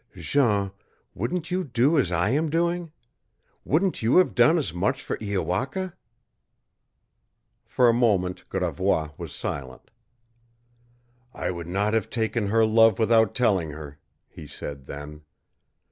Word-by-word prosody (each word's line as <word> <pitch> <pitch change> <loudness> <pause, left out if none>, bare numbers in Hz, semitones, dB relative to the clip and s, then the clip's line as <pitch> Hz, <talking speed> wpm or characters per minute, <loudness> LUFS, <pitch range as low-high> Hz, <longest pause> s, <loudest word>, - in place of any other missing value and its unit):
"Jean, 105 -9 +1 0.4
wouldn't 160 - -3
you 185 +1 0
do 130 +2 +2
as 105 -10 0
I 90 +4 +1
am 155 +4 +1
doing? 170 +1 -1 0.7
Wouldn't 175 +3 0
you 115 +7 +3
have 185 - +4
done 160 +3 +5
as 155 - -2
much 105 +10 -1
for - - -3
Iowaka?" 110 - -2 1.7
For 125 - +3
a 115 - +5
moment 100 -7 0
Gravois 90 -3 -1
was - - -7
silent. 65 -3 -6 1.4
"I - - -2
would 85 -2 -7
not 100 +4 0
have 110 -3 0
taken 110 -2 -1
her 110 +2 +3
love 115 -2 +5
without 110 -1 +3
telling 100 -10 +1
her," 75 -1 -10 0.3
he 75 - -12
said 70 -1 -8
then. 75 +1 -8
110 Hz, 130 wpm, -25 LUFS, 90-135 Hz, 1.7 s, done